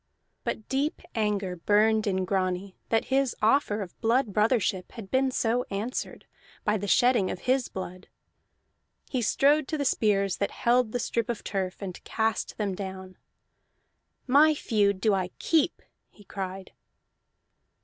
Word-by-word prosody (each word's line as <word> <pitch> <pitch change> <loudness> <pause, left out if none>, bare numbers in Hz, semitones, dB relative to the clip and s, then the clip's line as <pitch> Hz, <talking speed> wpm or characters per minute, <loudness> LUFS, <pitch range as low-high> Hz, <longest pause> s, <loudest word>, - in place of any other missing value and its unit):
But 220 - -4
deep 275 +3 -1
anger 205 -4 -1
burned 215 +4 +2
in 190 -1 0
Grani 185 0 -1
that 225 -1 +2
his 270 -2 +2
offer 215 -2 +2
of 180 - -13
blood 235 -1 +2
brothership 210 -4 +1
had 215 -5 -9
been 265 0 +3
so 245 -1 0
answered, 210 +6 -4 0.4
by 210 - +1
the 205 0 -4
shedding 235 0 +4
of - - -5
his 255 0 +1
blood. 185 0 -7 1.0
He 255 - 0
strode 280 +5 +3
to 310 - -2
the 285 - -1
spears 200 -6 +2
that 200 - 0
held 240 -1 +2
the 245 - -1
strip 235 -1 -2
of 235 - -3
turf, 190 -1 -3
and 185 -2 -7
cast 220 0 -1
them 205 -3 -1
down. 190 -1 -7 1.1
"My 300 +4 +5
feud 200 -7 +1
do 215 -1 +3
I 185 -2 0
keep!" 325 0 +1 0.3
he 205 - -19
cried. 190 -1 -6
210 Hz, 150 wpm, -27 LUFS, 190-245 Hz, 1.1 s, My